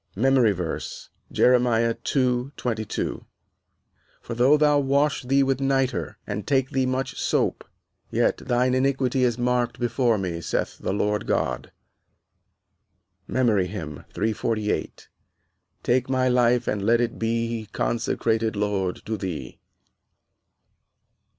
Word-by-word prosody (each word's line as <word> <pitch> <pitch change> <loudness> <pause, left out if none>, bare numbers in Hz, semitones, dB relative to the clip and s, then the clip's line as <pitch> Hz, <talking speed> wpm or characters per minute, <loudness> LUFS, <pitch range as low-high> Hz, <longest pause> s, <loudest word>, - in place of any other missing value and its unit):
MEMORY 130 0 +4
VERSE, 90 -4 -5 0.2
Jeremiah 120 -2 +3
2: 125 +1 -1
22 110 -4 -3 1.0
"For 120 - -7
though 130 +6 +4
thou 150 -1 +4
wash 140 +1 +1
thee 135 +2 +2
with 135 0 0
nitre, 135 -1 0
and 105 0 -5
take 135 -2 +1
thee 130 -1 +1
much 130 +1 -2
sope, - - 0 0.5
yet - - +1
thine 125 +1 +1
iniquity 130 -1 +1
is 120 -2 +1
marked 120 -1 0
before 120 -1 +1
me, 90 -4 -3
saith - - -2
the - - -2
Lord 105 +1 -1
God." - - -1 1.6
MEMORY 110 -8 +2
HYMN 80 -7 -7
_"Take 110 +3 -3
my 130 -1 +2
life 125 -1 +3
and 105 -2 -1
let 115 +3 +3
it 120 -1 -1
be 115 -1 -2
Consecrated, 115 -1 0
Lord, 100 -3 -2
to 110 +1 -2
thee." 85 -10 -6
120 Hz, 115 wpm, -24 LUFS, 110-130 Hz, 1.6 s, MEMORY